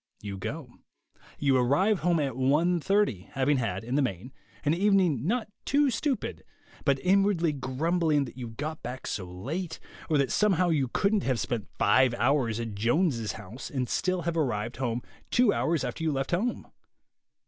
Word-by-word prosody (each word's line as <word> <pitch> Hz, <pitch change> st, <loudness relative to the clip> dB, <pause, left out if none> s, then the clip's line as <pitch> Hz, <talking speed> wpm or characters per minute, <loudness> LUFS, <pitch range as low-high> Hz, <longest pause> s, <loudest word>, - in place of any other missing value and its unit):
You 100 Hz, -1 st, -6 dB
go. 125 Hz, -, -6 dB, 0.6 s
You 140 Hz, -2 st, +3 dB
arrive 175 Hz, -, +3 dB
home 170 Hz, 0 st, +2 dB
at 135 Hz, -5 st, -1 dB
1 150 Hz, +7 st, +2 dB
:30, 165 Hz, -, +1 dB
having 135 Hz, +2 st, +2 dB
had, 105 Hz, -6 st, -2 dB
in 120 Hz, +3 st, -5 dB
the 145 Hz, -, +3 dB
main, 125 Hz, 0 st, -3 dB, 0.3 s
an 145 Hz, -, +3 dB
evening 180 Hz, -, +2 dB
not 235 Hz, +2 st, 0 dB, 0.2 s
too 285 Hz, -1 st, +3 dB
stupid, 265 Hz, +2 st, -2 dB, 0.4 s
but 140 Hz, -2 st, +3 dB
inwardly 185 Hz, -4 st, +3 dB
grumbling 145 Hz, +3 st, 0 dB
that 120 Hz, -, -10 dB
you 125 Hz, -2 st, -6 dB
got 150 Hz, +8 st, -5 dB
back 125 Hz, +2 st, -6 dB
so 95 Hz, -, -3 dB
late, 145 Hz, -, -5 dB, 0.3 s
or 155 Hz, -, +3 dB
that 140 Hz, -2 st, +1 dB
somehow 185 Hz, -4 st, +3 dB
you 145 Hz, -5 st, +2 dB
couldn't 200 Hz, -, +1 dB
have 130 Hz, -6 st, 0 dB
spent 115 Hz, -4 st, -2 dB
five 125 Hz, +4 st, +4 dB
hours 120 Hz, -3 st, +1 dB
at 115 Hz, -2 st, -4 dB
Jones's 115 Hz, -, +1 dB
house 110 Hz, +8 st, -8 dB
and 130 Hz, -3 st, -2 dB
still 185 Hz, +4 st, 0 dB
have 170 Hz, 0 st, -1 dB
arrived 120 Hz, -7 st, -1 dB
home 120 Hz, -2 st, -2 dB, 0.3 s
two 245 Hz, -4 st, +4 dB
hours 165 Hz, -1 st, 0 dB
after 165 Hz, -, -4 dB
you 160 Hz, -, +1 dB
left 135 Hz, -1 st, -2 dB
home. 215 Hz, +8 st, -1 dB
140 Hz, 170 wpm, -28 LUFS, 120-175 Hz, 0.6 s, five